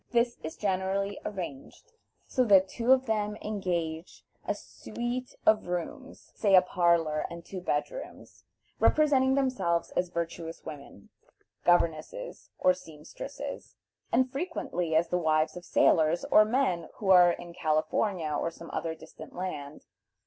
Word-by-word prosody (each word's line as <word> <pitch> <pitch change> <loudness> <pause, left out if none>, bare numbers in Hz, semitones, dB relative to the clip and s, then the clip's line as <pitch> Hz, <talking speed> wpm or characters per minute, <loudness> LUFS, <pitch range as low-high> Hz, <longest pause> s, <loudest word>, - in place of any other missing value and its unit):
This 235 0 +2
is 160 - -6
generally 195 0 -1
arranged 175 - -7 0.3
so 255 - +1
that 195 -3 +6
two 235 +5 0
of 260 0 +5
them 210 -2 -1
engage 175 -6 -4 0.2
a - - 0
suite 245 +1 -5
of 215 -3 +4
rooms, 180 - -6
say 200 -3 +3
a 185 - +9
parlor 170 -4 +2
and 170 0 -9
two 185 -2 -7
bed 150 -4 -1
rooms, - - -10 0.4
representing 270 -4 +4
themselves 255 -11 0
as 180 0 -1
virtuous 170 -1 -5
women, 140 -9 -10 0.6
governesses 175 - 0
or 185 - +4
seamstresses, 165 - -9 0.4
and 260 0 +2
frequently 180 - -2
as 165 +1 +3
the 180 - +1
wives 155 -1 +1
of 180 - -8
sailors 160 +1 +3
or - - +8
of 215 - +3
men 215 - 0
who 195 -3 0
are 180 -1 +7
in 175 0 -9
California 155 +1 0
or 155 - -1
some 165 0 -11
other 165 -1 -3
distant 160 0 -13
land. 155 -6 -6
180 Hz, 140 wpm, -29 LUFS, 165-215 Hz, 0.6 s, a